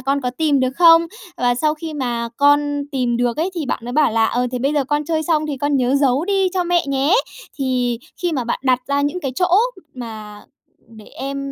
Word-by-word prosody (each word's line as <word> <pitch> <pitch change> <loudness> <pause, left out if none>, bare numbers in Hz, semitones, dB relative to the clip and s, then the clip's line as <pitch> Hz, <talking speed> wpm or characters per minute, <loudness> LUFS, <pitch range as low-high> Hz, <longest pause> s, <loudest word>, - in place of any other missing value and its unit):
con 275 +1 0
có 250 -2 -2
tìm 290 0 +1
được 255 0 +1
không?" 335 -1 +6 0.3
Và 245 -3 +1
sau 305 +5 +1
khi 315 0 -7
mà 240 -4 -2
con 290 0 +3
tìm 250 -3 0
được 240 -1 0
ấy, 335 +5 -1
thì 325 -5 -3
bạn - - -2
mới 245 - -5
bảo 290 -4 +3
là 225 0 +3
"Ờ, 245 +2 0
thế 250 - -2
bây 275 +4 0
giờ 290 -2 +1
con 295 +3 -1
chơi 315 +1 -1
xong 310 -1 0
thì 290 -2 -3
con 285 +1 0
nhớ 255 0 +1
giấu 275 +2 +2
đi 390 -1 +1
cho 365 -1 +1
mẹ 350 0 +1
nhé." 275 +5 +1 0.4
Thì 250 -3 0 0.2
khi 350 -1 0
mà 260 -5 -1
bạn 235 - -2
đặt 255 -1 +2
ra 280 0 0
những 290 +5 -1
cái 270 -6 -3
chỗ 360 +6 +1 0.5
mà 215 -4 -8 0.5
để 215 - -12
em 275 +1 -6
275 Hz, 235 wpm, -19 LUFS, 250-305 Hz, 0.5 s, không